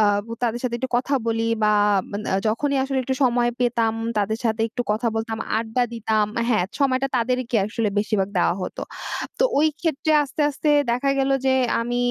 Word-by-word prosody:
আ - - +5 0.2
বু 230 - -7
তাদের 240 0 0
সাথে 240 -2 -2
একটু 260 - -3
কথা 275 +3 0
বলি 225 0 0 0.2
বা 210 - +4 0.4
মান 205 +1 -4
আ - - +3
যখনই 280 +5 0
আসলে 270 -1 -1
একটু 265 +1 -1
সময় 240 -1 +2
পেতাম, 230 -2 +1 0.2
তাদের 220 +2 0
সাথে 220 0 0
একটু 245 +2 -3
কথা 225 +3 -1
বলতাম, 225 0 -3 0.2
আড্ডা 230 +2 -1
দিতাম 220 -2 +1 0.3
হ্যাঁ, 180 -3 +1
সময়টা 270 0 +2
তাদেরকে 245 0 0
আসলে 215 0 -1
বেশিরভাগ 205 -2 0
দেওয়া - - +2
হতো। - - -5 0.6
তো - - +3 0.2
ওইক্ষেত্রে 310 0 +1
আস্তে, 280 +2 -6
আস্তে 295 +2 -3 0.2
দেখা 265 +3 +1
গেল 270 0 +1 0.2
যে, - - +4 0.3
আমি 240 +1 -2
240 Hz, 185 wpm, -23 LUFS, 220-265 Hz, 0.6 s, আ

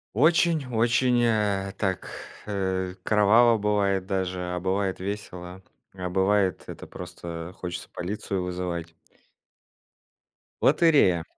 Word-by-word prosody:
Очень 160 +1 +3
очень, 120 +2 +3
э, 100 -4 +1
так 95 -3 -2 0.4
э, 95 -2 -2
кроваво 110 +3 +5
бывает 100 -2 +1
даже, 95 -2 -2
а 90 - -2
бывает 95 +1 -1
весело, 95 -2 -6 0.3
а 90 -1 -5
бывает 95 0 +1
это - - -9
просто 85 -1 -8
хочется 90 -1 -6
полицию 95 0 -3
вызывать. 90 -2 -4 1.7
Лотерея. 140 - +4
95 Hz, 100 wpm, -26 LUFS, 90-105 Hz, 1.7 s, кроваво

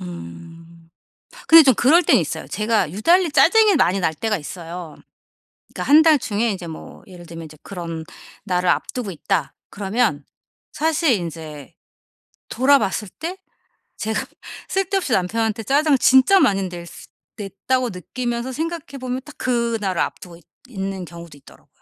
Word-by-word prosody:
음. 90 - -11 0.6
근데 325 0 +10
좀 265 -3 +4
그럴 310 - +4
땐 - - +4
있어요. - - -4
제가 215 -6 0
유달리 335 - +3
짜증이 430 +4 +5
많이 195 -7 +2
날 165 -3 0
때가 215 +6 -1
있어요. 170 0 -8 0.8
그러니까 - - -4
1 310 +2 +9
달 315 -2 +5
중에 235 -2 -1
이제 185 -3 -7
뭐 160 -1 -10
예를 180 -2 -13
들면 165 0 -9
인제 155 -1 -13
'그런 170 -4 -6 0.4
날을 180 -2 0
앞 - - -1
두고 245 -6 -4
있다.' 170 -2 -2 0.2
그러면 195 - -1 0.5
사실 320 -2 +1
인제 160 - -5 0.7
돌아봤을 255 -5 +2
때 350 +4 -5 0.6
제가 220 0 -2 0.4
쓸데없이 385 -5 -1
남편한테 220 +3 0
짜증을 285 +5 +3
진짜 265 +10 +5
많이 195 - +2
낼 175 -1 -8
수 - - -13 0.3
냈다고 230 +6 -2
느끼면서 235 +6 -4
생각해 315 -1 -5
보면 255 0 -3
딱 300 - -13
그날을 230 -7 -1
앞 - - -2
두고 170 -2 -12
있 175 - -22 0.3
있는 195 -4 -5
경우도 170 -2 -12
있더라고요. 135 - -19
210 Hz, 310 characters per minute, -21 LUFS, 170-260 Hz, 0.8 s, 근데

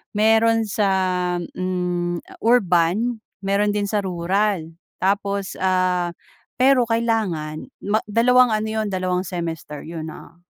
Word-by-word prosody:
Meron 225 +1 +4
sa, 205 0 +1 0.5
hmm, 175 -1 -2 0.2
urban, 220 0 +2 0.2
meron 200 +1 +2
din 205 -1 0
sa 210 - +1
rural. 185 -1 -1 0.3
Tapos, 200 0 0
ah, 185 -2 +1 0.4
pero 255 -1 +4
kailangan 215 -10 -1 0.3
ma 215 - +4
dalawang 245 +2 +4
ano 215 0 0
'yon, 220 -1 -1
dalawang 185 -1 -1
semester 165 -4 -5
'yon, 160 -1 -6
ah. 165 - -14
195 Hz, 115 wpm, -22 LUFS, 175-220 Hz, 0.5 s, Meron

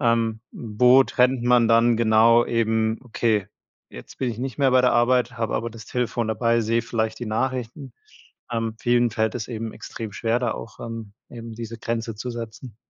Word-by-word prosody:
Ähm, 115 -3 +1
wo 125 +4 +4
trennt 125 -1 +2
man 120 -1 +4
dann 115 0 +4
genau 115 +1 +5
eben: 110 -1 0
„Okay, 110 -4 0 0.4
jetzt - - -12
bin 130 -2 -1
ich 115 - -7
nicht 130 +1 -5
mehr 135 -2 +3
bei 130 - +6
der 125 - +3
Arbeit, 120 0 +2
habe 115 -1 -1
aber 115 +1 -2
das 110 -2 -12
Telefon 120 -2 -2
dabei, 115 +1 +1
sehe 115 +1 0
vielleicht 110 -1 -2
die 120 - -4
Nachrichten.“ 130 +3 -3 0.6
Ähm, 115 -1 -2
vielen 120 0 +2
fällt 110 0 0
es 110 - -4
eben 115 -2 -5
extrem 110 -2 -7
schwer, 115 +2 0
da 120 -2 -1
auch, 110 - -9
ähm, 115 -3 -7 0.2
eben 115 -1 -9
diese 115 0 -7
Grenze 115 -1 -3
zu 115 +4 -6
setzen. 115 0 -8
115 Hz, 185 wpm, -23 LUFS, 110-120 Hz, 0.6 s, bei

